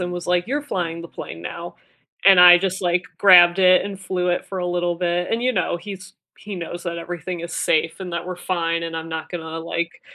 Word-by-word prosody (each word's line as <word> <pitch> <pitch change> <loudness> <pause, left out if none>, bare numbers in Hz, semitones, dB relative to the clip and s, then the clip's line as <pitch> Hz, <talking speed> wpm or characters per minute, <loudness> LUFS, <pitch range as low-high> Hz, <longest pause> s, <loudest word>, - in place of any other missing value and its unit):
and 180 0 -3
was 175 -1 -6
like, 180 +1 +1
"You're 285 +4 -2
flying 170 - -4
the 170 - -10
plane 85 - -9
now," 170 - -7 0.5
and 195 -2 +8
I 175 0 +10
just, 190 0 -2
like, 175 0 +1 0.2
grabbed 180 -2 +7
it 185 -1 +5
and 195 -1 -7
flew 180 -1 -2
it 175 - -1
for 195 - -7
a 180 - -2
little 175 0 -1
bit, 175 0 -1
and 230 +1 -1
you 255 - +1
know, 200 - -1
he's 190 -1 -10 0.2
he 205 -1 -8
knows 175 0 -7
that 170 -1 -4
everything 175 +1 -6
is 170 0 -7
safe, 160 +3 0
and 185 -2 -6
that 170 +1 -4
we're 180 -1 -5
fine, 170 -2 -2
and 165 0 -5
I'm 160 0 -6
not 160 -1 -5
gonna, 165 -2 -6
like, 170 0 -4
175 Hz, 235 wpm, -21 LUFS, 170-185 Hz, 0.5 s, I